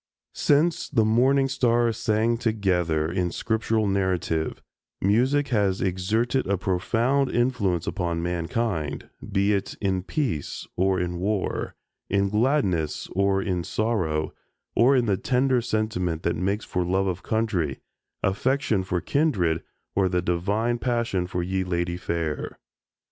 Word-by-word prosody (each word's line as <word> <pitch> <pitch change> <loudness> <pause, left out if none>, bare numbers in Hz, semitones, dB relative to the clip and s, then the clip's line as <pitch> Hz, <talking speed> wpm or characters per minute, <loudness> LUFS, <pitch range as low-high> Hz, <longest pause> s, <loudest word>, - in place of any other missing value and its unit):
Since 155 +3 +2
"the 115 -7 +2
morning 130 +5 +3
stars 120 -3 +2
sang 115 +1 +1
together" 90 -9 0
in 90 -1 0
Scriptural 110 +2 0
narrative, 95 -5 0 0.4
music 130 +9 +2
has 100 -6 +1
exerted 105 +8 0
a 100 0 +1
profound 115 +9 +1
influence 110 -9 +1
upon 85 -4 -2
mankind, 85 -3 -2 0.2
be 100 +1 +2
it 100 - -2
in 95 -2 0
peace 110 - -3
or 95 +1 +2
in 90 0 -2
war, 100 +1 -2 0.3
in 100 0 +2
gladness 105 - +1
or 100 0 +1
in 90 -3 -1
sorrow, 90 -9 -1 0.4
or 125 +5 +5
in 125 -2 +3
the 100 -4 +1
tender 130 +2 +2
sentiment 110 -8 -1
that 85 - +1
makes 100 +5 -1
for 90 - -1
love 95 +2 +1
of 90 -1 -2
country, 100 - -1 0.5
affection 110 0 +1
for 90 -1 -2
kindred 95 - +1 0.3
or 95 -1 +3
the 90 -1 0
divine 105 +8 0
passion 115 -7 0
for 90 -1 -2
"ye 95 +1 -1
ladye 85 -1 -1
fair." 80 -5 -3
100 Hz, 130 wpm, -25 LUFS, 90-115 Hz, 0.5 s, or